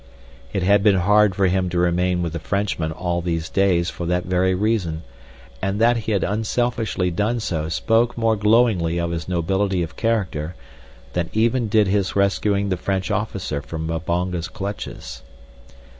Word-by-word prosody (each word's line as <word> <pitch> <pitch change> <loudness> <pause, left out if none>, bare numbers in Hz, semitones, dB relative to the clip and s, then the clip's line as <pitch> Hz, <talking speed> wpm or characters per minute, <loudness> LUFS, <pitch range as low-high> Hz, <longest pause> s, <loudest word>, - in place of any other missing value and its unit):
It 95 - -1
had 100 +2 +4
been 105 -1 +4
hard 105 +2 +4
for 100 - +2
him 95 0 +1
to 90 - -3
remain 90 +1 +1
with 85 -2 -3
the 85 - -3
Frenchman 95 -2 -1
all 85 +1 -2
these 80 -2 -2
days 90 -3 +2
for 85 - -5
that 90 +1 0
very 95 +1 +1
reason, 90 -6 -1 0.6
and 95 +1 -1
that 120 +2 +4
he 115 -1 -3
had 100 - +1
unselfishly 110 -3 -1
done 105 +7 0
so 80 -7 -2
spoke 115 +8 +1
more 115 -1 +2
glowingly 105 -6 +3
of 85 0 -1
his 85 -1 -4
nobility 95 +1 0
of 80 - -7
character 90 -8 -1 0.6
than 85 -1 -1
even 115 +2 +2
did 105 0 +3
his 95 -1 0
rescuing 100 0 +1
the 95 - 0
French 95 +2 -2
officer 100 -8 -2
from 80 +2 -6
Mbonga's 85 +1 -2
clutches. 100 +4 -6
95 Hz, 165 wpm, -22 LUFS, 85-105 Hz, 0.6 s, had